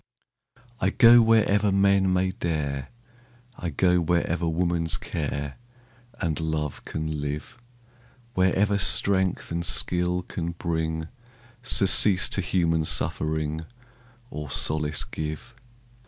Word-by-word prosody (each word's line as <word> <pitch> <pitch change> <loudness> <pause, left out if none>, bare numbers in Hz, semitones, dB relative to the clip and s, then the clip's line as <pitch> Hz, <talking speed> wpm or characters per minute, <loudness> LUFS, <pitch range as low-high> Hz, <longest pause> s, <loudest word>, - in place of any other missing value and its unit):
I 95 - +1
go 120 +3 +6
wherever 105 -2 +2
men 100 -1 +2
may 95 0 0
dare, 75 -6 -4 0.7
I 85 - -5
go 90 +4 +2
wherever 85 0 -1
woman's 85 -1 0
care 70 -5 -5 0.6
And 80 -5 -2
love 80 -3 -3
can 80 -1 -4
live, 75 - -6 0.7
Wherever 95 +2 +1
strength 95 -2 +3
and 85 0 -2
skill 90 +1 +1
can 85 -1 -5
bring 80 -2 -3 0.5
Surcease 100 -3 +4
to 100 - 0
human 85 -3 0
suffering, 80 0 -1 0.7
Or 75 -1 -7
solace 75 +1 +1
give. 80 +10 -7
85 Hz, 105 wpm, -25 LUFS, 80-95 Hz, 0.7 s, go